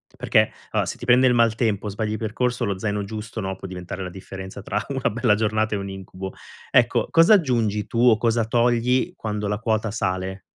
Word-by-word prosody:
Perché, - - +2 0.2
allora, - - 0
se - - -4
ti - - -8
prende 125 +2 +5
il 125 - +4
maltempo 110 -3 +1
o - - -2
sbagli 105 +1 -3
il 110 - -2
percorso 120 +2 -1
lo 100 -4 -1
zaino 105 0 -1
giusto, 110 +2 -6
no, 95 -1 -3
può 95 - -8
diventare 90 +1 -6
la 90 - -5
differenza 95 +1 -9
tra - - -2
una 135 -2 0
bella 115 0 +2
giornata 110 0 0
e - - -1
un 100 0 -5
incubo. 95 0 -7 0.4
Ecco, - - +3
cosa 165 +6 +6
aggiungi 115 - +1
tu - - -5
o 110 -3 +6
cosa 115 0 +1
togli, 120 +2 +1
quando 105 -1 -3
la 105 - 0
quota 110 -1 0
sale? 95 -2 -2
110 Hz, 210 wpm, -23 LUFS, 100-115 Hz, 0.4 s, cosa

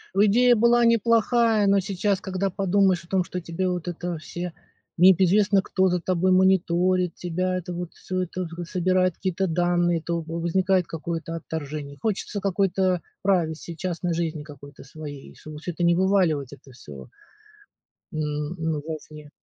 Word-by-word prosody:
Ну 205 +2 +5
идея 245 +4 +5
была 235 +1 +4
неплохая, 230 -1 +3
но 200 0 +4
сейчас, 195 +1 -1
когда 190 0 -2
подумаешь 190 -1 +2
о - - -18
том, 185 0 +1
что 180 +1 -5
тебе 175 +3 -2
вот 180 -1 -3
это 175 -1 -4
все 175 +2 -6 0.4
не 185 +2 +8
п 190 - +1
известно, 200 +1 +4
кто 190 -1 +1
за 180 -1 0
тобой 185 +1 +1
мониторит 185 -1 +2
тебя, 185 +1 -2
это 180 0 -4
вот 175 -1 -6
всё 185 0 -3
это 185 +1 -4
г 170 +1 -7
собирает 185 +1 +1
какие-то 190 0 -1
данные. 175 0 +1
То 170 0 -2
во 165 +1 -5
возникает 185 +1 +1
какое-то 165 0 -5
отторжение, 150 -3 -6
хочется 205 -1 -2
какой-то 190 -2 +1 0.2
privacy, 170 -3 0
частной 175 0 -2
жизни 160 -2 -2
какой-то 145 -2 -13
своей. 145 -1 -10
Чтобы 155 -1 -10
всё 175 - -5
это 175 +1 -4
не 170 0 +4
вываливать, 180 -8 +1
это 135 -1 -15
всё. 70 - -12 1.0
М. 150 +1 -3
Ну 160 -2 -1
во 160 -1 -3
вне. 150 -1 -12
180 Hz, 165 wpm, -24 LUFS, 165-190 Hz, 1.0 s, не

